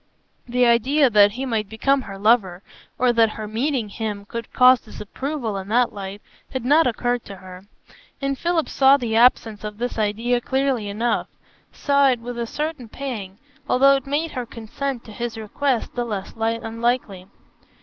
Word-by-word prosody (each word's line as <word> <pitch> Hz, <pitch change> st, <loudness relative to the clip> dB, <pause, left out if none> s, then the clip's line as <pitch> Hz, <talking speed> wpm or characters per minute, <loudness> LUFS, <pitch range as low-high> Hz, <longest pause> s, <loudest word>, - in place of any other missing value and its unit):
The 245 Hz, +1 st, +2 dB
idea 255 Hz, +4 st, +3 dB
that 205 Hz, -1 st, +5 dB
he 260 Hz, +4 st, -4 dB
might 220 Hz, -5 st, -2 dB
become 270 Hz, +5 st, +1 dB
her 195 Hz, -5 st, -9 dB
lover 195 Hz, -4 st, +2 dB, 0.3 s
or 250 Hz, 0 st, +3 dB
that 230 Hz, -1 st, +4 dB
her 215 Hz, 0 st, -7 dB
meeting 240 Hz, +2 st, -1 dB
him 205 Hz, -1 st, -5 dB
could 230 Hz, +1 st, -7 dB
cause 255 Hz, 0 st, +6 dB
disapproval 230 Hz, +1 st, -5 dB
in 190 Hz, 0 st, -6 dB
that 240 Hz, +3 st, +2 dB
light, 200 Hz, 0 st, -7 dB, 0.3 s
had 260 Hz, -2 st, -4 dB
not 300 Hz, +4 st, +5 dB
occurred 245 Hz, 0 st, -1 dB
to 200 Hz, -, -9 dB
her; 185 Hz, 0 st, -12 dB, 0.5 s
and 275 Hz, 0 st, -1 dB
Philip 340 Hz, +2 st, 0 dB
saw 270 Hz, +1 st, +5 dB
the 235 Hz, -4 st, -2 dB
absence 225 Hz, -3 st, +3 dB
of 210 Hz, -1 st, -6 dB
this 245 Hz, 0 st, -3 dB
idea 230 Hz, +4 st, 0 dB
clearly 265 Hz, -5 st, -1 dB
enough, 225 Hz, +4 st, -1 dB, 0.4 s
saw 280 Hz, -1 st, +3 dB
it 250 Hz, -2 st, +1 dB
with 240 Hz, +1 st, -6 dB
a 235 Hz, -, -2 dB
certain 300 Hz, -4 st, -4 dB
pang, 215 Hz, -8 st, -6 dB, 0.3 s
although 275 Hz, +2 st, +5 dB
it 270 Hz, -1 st, -4 dB
made 300 Hz, +3 st, -1 dB
her 250 Hz, -3 st, -5 dB
consent 240 Hz, +3 st, -5 dB
to 220 Hz, -, -12 dB
his 235 Hz, +1 st, -5 dB
request 235 Hz, +4 st, -2 dB
the 245 Hz, -, -2 dB
less 205 Hz, -5 st, -5 dB
unlikely. 225 Hz, -3 st, -2 dB
235 Hz, 170 wpm, -22 LUFS, 215-265 Hz, 0.5 s, cause